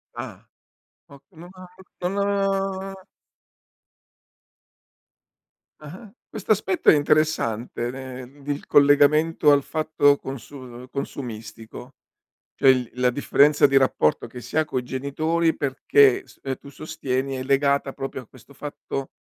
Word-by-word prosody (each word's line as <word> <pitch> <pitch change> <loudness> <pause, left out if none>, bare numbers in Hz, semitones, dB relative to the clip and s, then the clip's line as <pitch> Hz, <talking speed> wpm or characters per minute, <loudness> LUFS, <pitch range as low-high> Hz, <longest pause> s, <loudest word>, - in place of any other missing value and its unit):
Ah, - - -8 0.6
ok 140 -1 -16
non 175 0 -13
av 185 -1 -12 0.4
non 195 -1 -2 2.7
Ah-ah. 185 +8 -12 0.2
Questo 215 -1 -4
aspetto 190 -3 +2
è - - +7
interessante 145 -6 0
nel 130 +1 -10
d 140 - -17
il 145 0 -3
collegamento 145 +2 +4
al 140 -1 +3
fatto 155 -2 +2
consu 135 0 -9
uhm, 125 -1 -11
consumistico. 115 -2 -8 0.6
Cioè, 135 - +4
il 125 -2 +3
la 125 0 +2
differenza 145 +3 +3
di 135 0 +3
rapporto 130 - +1
che 125 +1 -10
si 120 +6 -6
ha 155 - +3
coi 130 -4 -3
genitori, 155 +6 -1
perché 135 -1 +3
s - - -20
uhm, 135 -1 -3
tu 140 - -14
sostieni 135 -2 -4
è 130 - -4
legata 140 +1 +1
proprio 135 -1 -6
a 125 - -17
questo 130 +3 -18
fatto, 140 -1 -6
140 Hz, 130 wpm, -23 LUFS, 130-155 Hz, 2.7 s, è